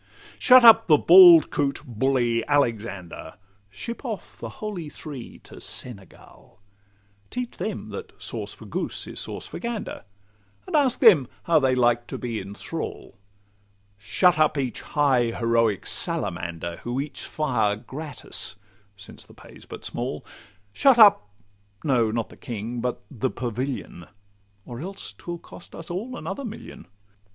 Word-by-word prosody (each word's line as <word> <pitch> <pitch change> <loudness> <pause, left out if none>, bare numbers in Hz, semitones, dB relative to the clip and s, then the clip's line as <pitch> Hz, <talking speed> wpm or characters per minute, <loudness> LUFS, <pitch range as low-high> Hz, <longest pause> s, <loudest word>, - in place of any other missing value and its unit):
Shut 255 -1 +7
up 225 -1 +8
the 155 -3 +6
bald 175 -1 +8
coot 140 -1 -1
bully 120 -1 0
Alexander! 110 - -2 0.3
Ship 230 - -7
off 195 - -6
the 115 - -6
Holy 180 - -6
Three 145 -5 -9
to - - -13
Senegal; 100 -8 -8 0.7
Teach 245 -1 -5
them - - -4
that 455 -1 -9
'sauce - - -5
for - - -12
goose - - -3
is - - -6
sauce - - -4
for - - -8
gander,' 235 - -5 0.6
And - - -4
ask 265 -4 +2
them 180 - +7 0.2
how 165 -2 +4
they 130 -2 +2
like 120 -1 +2
to - - -5
be 115 -3 -4
in 100 +2 -8
thrall? 165 +8 -6 0.9
Shut 160 - +2
up 155 -1 +3
each 130 -3 -3
high 135 -5 +2
heroic 115 -3 0
salamander, 85 0 -3
Who 120 +2 -4
eats 145 +1 -5
fire 120 -9 0
gratis 135 +5 -3 0.4
(since 95 - -12
the - - -18
pay - - -15
's - - -15
but - - -8
small); - - -4 0.5
Shut 270 - +4
up—no, 105 - +2
not 115 0 -2
the - - -15
King, 120 +1 -5
but 125 0 -3
the 130 -1 -2
Pavilion, 125 -7 -5 0.6
Or 120 -1 -8
else 195 +4 -7
'twill 175 0 -7
cost 170 - -14
us 165 +1 -8
all 230 +8 -5
another 280 - -5
million. 225 - -9
130 Hz, 145 wpm, -24 LUFS, 115-175 Hz, 0.9 s, up